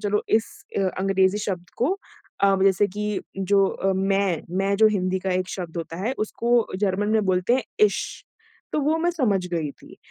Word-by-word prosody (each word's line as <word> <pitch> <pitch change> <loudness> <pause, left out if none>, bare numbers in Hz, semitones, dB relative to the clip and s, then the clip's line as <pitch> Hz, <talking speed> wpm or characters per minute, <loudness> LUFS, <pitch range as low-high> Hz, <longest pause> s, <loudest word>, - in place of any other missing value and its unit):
चलो 210 0 +1
इस 220 0 +3 0.3
अ, - - +2 0.2
अंग्रेज़ी 190 +1 +2
शब्द 185 -4 -4
को 300 +11 +1 0.5
अब 195 -1 +3
जैसे 195 +1 +4
कि 210 +1 -3 0.2
जो 195 +1 +3
अ, 195 0 -1
मैं, 195 -2 +1
मैं 195 +2 +1
जो 220 +2 +6
हिंदी 190 -3 0
का 190 +1 -3
एक 185 0 -1
शब्द 175 -3 -6
होता 165 0 -5
है, 250 - +1
उसको 235 +2 +1
जर्मन 200 +1 0
में 215 -1 +2
बोलते 185 +5 +2
हैं 260 - +1 0.2
इश। 200 - -5 0.5
तो 300 - +1
वो 305 +3 +2
मैं 345 +2 +2
समझ 215 - 0
गई 160 -4 -1
थी, - - -16
195 Hz, 190 wpm, -24 LUFS, 185-215 Hz, 0.5 s, जो